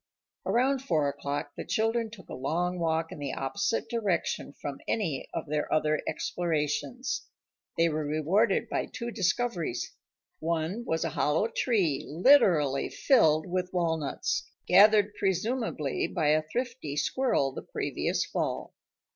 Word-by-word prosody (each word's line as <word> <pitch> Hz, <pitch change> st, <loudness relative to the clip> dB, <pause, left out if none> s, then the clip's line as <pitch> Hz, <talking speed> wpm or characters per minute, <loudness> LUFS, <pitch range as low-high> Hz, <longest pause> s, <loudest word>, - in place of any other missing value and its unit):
Around 255 Hz, +7 st, +2 dB
four 155 Hz, -, +1 dB
o'clock 145 Hz, +1 st, -4 dB
the -, -, -5 dB
children 225 Hz, +1 st, 0 dB
took 210 Hz, -5 st, -13 dB
a -, -, -8 dB
long 175 Hz, +7 st, -1 dB
walk 165 Hz, -1 st, 0 dB
in -, -, -8 dB
the 145 Hz, -, -3 dB
opposite 200 Hz, -, -1 dB
direction 205 Hz, -10 st, -1 dB
from 140 Hz, -1 st, -7 dB
any 165 Hz, -12 st, -1 dB
of 165 Hz, -, -4 dB
their 150 Hz, 0 st, -2 dB
other 155 Hz, 0 st, +2 dB
explorations. 170 Hz, -, -2 dB, 0.5 s
They 165 Hz, -, +4 dB
were 155 Hz, -1 st, -1 dB
rewarded 180 Hz, +8 st, +2 dB
by -, -, -2 dB
two 235 Hz, -1 st, -5 dB
discoveries. 185 Hz, -, -1 dB, 0.5 s
One 170 Hz, +7 st, -2 dB
was 160 Hz, 0 st, 0 dB
a -, -, 0 dB
hollow 150 Hz, +8 st, +1 dB
tree 185 Hz, -, +1 dB
literally 165 Hz, -, +4 dB
filled 160 Hz, -, +3 dB
with 180 Hz, 0 st, -2 dB
walnuts, 160 Hz, -5 st, -1 dB, 0.2 s
gathered 210 Hz, 0 st, +6 dB
presumably 195 Hz, -, -1 dB
by 160 Hz, -5 st, 0 dB
a 155 Hz, +1 st, +4 dB
thrifty 235 Hz, -, -4 dB
squirrel 195 Hz, -, +1 dB
the -, -, -6 dB
previous -, -, -2 dB
fall. -, -, -3 dB
170 Hz, 135 wpm, -29 LUFS, 150-220 Hz, 0.5 s, gathered